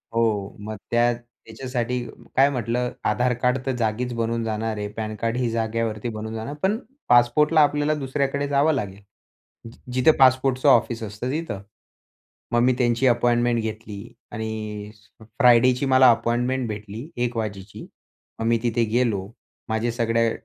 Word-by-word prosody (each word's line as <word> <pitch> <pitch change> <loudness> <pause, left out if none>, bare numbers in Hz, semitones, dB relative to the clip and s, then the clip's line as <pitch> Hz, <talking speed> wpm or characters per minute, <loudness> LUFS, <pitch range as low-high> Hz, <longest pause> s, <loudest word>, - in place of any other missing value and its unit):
हो 110 -4 0
मग 110 +1 -6 0.2
त्या 120 +1 +3
त्याच्यासाठी 120 +1 -5 0.4
काय 135 +2 +5
म्हटलं 125 -1 -2 0.2
आधार 125 0 +1
कार्ड 125 +1 +2
तर 135 - 0
जागीच 120 +1 -1
बनवून 115 0 -1
जाणार 110 0 -2
आहे. 105 0 -3
पॅनकार्ड 110 +2 -3
ही 125 -2 0
जागेवरती 115 0 -2
बनवून 110 0 -6
जाणार 110 +6 -5
पण, 200 +3 +2 0.3
पासपोर्टला 150 +6 +5
आपल्याला 145 +1 +2
दुसऱ्याकडे 140 +1 -1
जावं 145 +3 +3
लागेल. 100 -6 -4 0.9
जिथे 130 +5 +4
पासपोर्टचं 130 0 +4
ऑफिस 115 0 +3
असतं 110 +4 -5
तिथं. 150 -9 -3 0.9
मग 120 - +3
मी 130 +1 +4
त्यांची 120 0 +2
अपॉइंटमेंट 120 -1 +2
घेतली 110 0 -7 0.2
आणि 110 -1 -5 0.3
फ्रायडेची 125 +3 +3
मला 130 -1 +6
अपॉइंटमेंट 120 +3 0
भेटली 105 +5 -7 0.2
1 120 -1 -3
वाजेची. 100 -3 -5 0.5
मग 115 - -2
मी 115 0 +3
तिथे 120 -1 +1
गेलो 105 -6 0 0.4
माझ्या 110 +1 -1
सगळ्या 115 -1 +1
120 Hz, 140 wpm, -23 LUFS, 110-125 Hz, 0.9 s, मला